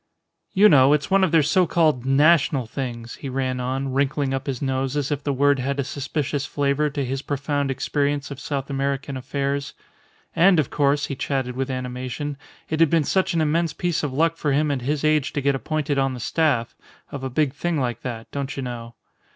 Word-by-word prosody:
"You 205 +2 +7
know, 140 -5 +6
it's 150 +4 0
one 195 0 +4
of 185 - +2
their 160 -2 +5
so 175 +5 +3
called 155 -7 +2
national 140 -1 +4
things," 120 -1 -6
he 140 - -6
ran 130 -1 -2
on, 130 +1 -2
wrinkling 140 0 0
up 135 +1 -3
his 130 -3 -2
nose 135 0 -1
as 145 0 -1
if 145 -1 -2
the 145 - 0
word 140 +1 +3
had 140 +2 -2
a - - +2
suspicious 140 +1 -3
flavour 145 +1 0
to 140 -1 -3
his 135 +2 -3
profound 145 0 -2
experience 145 +1 -1
of 140 - -7
South 140 -1 -4
American 140 0 -2
affairs. 140 +2 -3 0.6
And, 180 0 +5
of 145 - 0
course, 140 0 +2
he 140 - -4
chatted 130 -2 -2
with 135 +1 -2
animation, 130 +3 -4 0.3
it 155 - -2
had 165 -2 +5
been 165 -1 +3
such 190 +3 +1
an 165 - +2
immense 160 +1 +1
piece 175 -2 -1
of 145 - -2
luck 165 +5 +1
for 145 -3 0
him 150 +1 +2
at 135 -3 -2
his 145 +4 -1
age 155 -2 +2
to - - -1
get 140 +1 +2
appointed 145 +1 -1
on 135 -1 0
the - - -7
staff 130 -3 0 0.4
"of 140 -2 -6
a 130 - -2
big 135 +1 +1
thing 165 +1 -1
like 120 -3 -2
that 115 -3 -6
don't 140 -1 -4
you 135 - -3
know." 120 -2 -6
140 Hz, 215 wpm, -23 LUFS, 130-150 Hz, 0.6 s, You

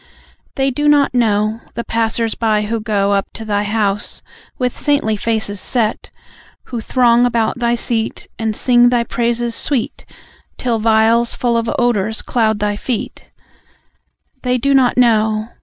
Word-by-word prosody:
They 270 -1 +1
do 295 +3 -1
not 290 -2 +3
know, 220 -2 +1
The 235 - -3
passers 225 0 -1
by, 215 -2 0
who 225 +2 -2
go 205 -2 0
Up 200 -1 0
to 225 - -8
Thy 205 -1 0
house, 205 -1 -1 0.3
with 250 -1 -1
saintly 285 -7 0
faces 215 -2 -2
set; 230 -4 -1 0.5
Who 240 -3 -6
throng 240 0 +3
about 235 -1 0
Thy 235 -1 +1
seat, 230 -1 -2
And 220 -1 -1
sing 240 0 +4
Thy 240 -1 +1
praises 235 0 -1
sweet, 260 -2 -2 0.5
Till 235 -3 -1
vials 225 +2 +3
full 240 -1 0
of 230 0 0
odours 220 -3 0
cloud 220 -3 +1
Thy 205 0 -1
feet; 240 +1 -5 1.1
They 250 0 0
do 275 +3 +1
not 260 -3 +3
know 220 -2 +2
230 Hz, 150 wpm, -17 LUFS, 215-245 Hz, 1.1 s, sing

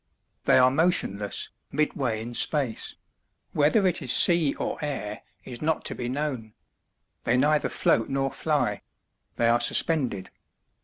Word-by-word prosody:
They - - +5
are 130 0 +5
motionless, 135 - 0 0.2
midway 135 -6 -1
in 120 +1 -8
space 130 -2 0 0.6
whether 155 +8 +2
it 180 - 0
is 125 - 0
sea 165 -1 +5
or - - -4
air 130 -8 -5 0.2
is 120 -2 -9
not 160 +1 -1
to - - -2
be 120 -1 -5
known. 130 -6 -4 0.7
They 120 - +1
neither 150 +3 +2
float 115 - +1
nor 135 0 -1
fly; - - -1 0.5
they 115 - +1
are 120 +1 +3
suspended. 120 - +1
130 Hz, 140 wpm, -25 LUFS, 115-150 Hz, 0.7 s, They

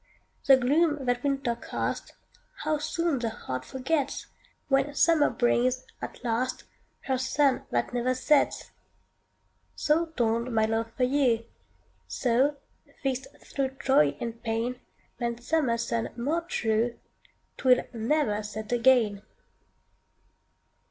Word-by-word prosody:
The 270 -1 +8
gloom 290 +2 +2
that 245 0 0
winter 275 -4 0
cast, - - -4 0.5
How 310 0 0
soon 330 -1 -1
the 235 -1 -1
heart 130 -11 -5
forgets, 265 - -2 0.4
When 275 +1 +1
summer 320 -2 +4
brings, 250 +1 +1 0.2
at - - -7
last, 245 +2 -1 0.4
Her 260 -1 -1
sun 270 +1 +1
that 120 - -1
never 250 +1 +1
sets! 285 +3 +2 1.0
So 320 +3 +2
dawned 235 -5 0
my 220 0 +4
love 225 +1 -1
for 255 - +1
you; 250 -4 +2 0.6
So, 265 +4 +1 0.5
fixt 265 -1 -1 0.2
thro' 275 -1 -1
joy 150 - +3
and 230 0 -5
pain, 235 +2 -2 0.4
Than 235 -1 -1
summer 255 -2 +1
sun 230 0 -2
more 295 +8 0
true, 235 -7 0 0.6
'Twill 250 -1 +4
never 230 -2 0
set 215 +1 -6
again. 235 -4 +3
250 Hz, 120 wpm, -28 LUFS, 230-280 Hz, 1.0 s, The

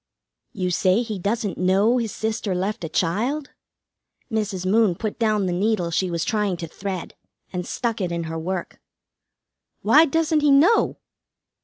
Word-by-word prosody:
"You 180 -3 -2
say 185 +5 +2
he 215 -4 -5
doesn't 205 +2 -2
know 195 +7 +3
his 225 -3 -2
sister 220 -3 -2
left 190 +1 -2
a 165 - -3
child?" 235 - -1 0.8
Mrs. 205 -4 -2
Moon 205 -1 +3
put 215 +4 -4
down 215 -3 +2
the 180 - -1
needle 185 -2 0
she 185 +2 0
was 170 -1 -2
trying 210 -5 0
to 165 - -5
thread, 190 +1 -5 0.4
and 180 -1 -3
stuck 230 -3 -2
it 180 -2 -1
in 170 0 -2
her 160 0 -4
work. 180 +2 -4 1.0
"Why 315 - +6
doesn't 320 +1 +1
he 295 0 +3
know?" 310 +11 +4
205 Hz, 160 wpm, -23 LUFS, 180-230 Hz, 1.0 s, Why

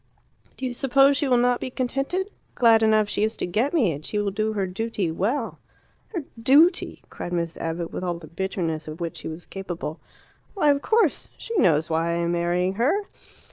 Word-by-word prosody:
Do 265 - -4
you 250 - -2
suppose 275 +2 +4
she 285 0 0
will 250 -2 +4
not 245 0 +2
be - - -3
contented? 275 +10 -2 0.2
Glad 230 -2 +5
enough 215 -1 +4
she 205 0 -1
is 220 +1 -1
to - - -2
get 220 +11 0
me, 255 - +2
and 145 0 -6
she 210 - -3
will 205 -1 0
do 215 +2 -1
her 200 -2 0
duty 195 -2 -2
well." 225 - -2 0.5
"Her 350 -8 -4 0.2
duty!" 300 +9 +4
cried 175 - -6
Miss 170 -1 -1
Abbott, 165 +1 -4
with - - -4
all 175 -1 -1
the 170 - -11
bitterness 165 -2 -3
of 155 +2 -7
which 170 -1 -4
she - - -6
was 160 +2 -7
capable. 175 -5 -6 0.6
"Why, 300 -7 +4
of 280 0 0
course. 435 - +1
She 460 - -6
knows 160 - +3
why 165 +1 +1
I - - 0
am 170 0 0
marrying 175 +2 0
her." 350 +12 +2
210 Hz, 205 wpm, -24 LUFS, 170-270 Hz, 0.6 s, Glad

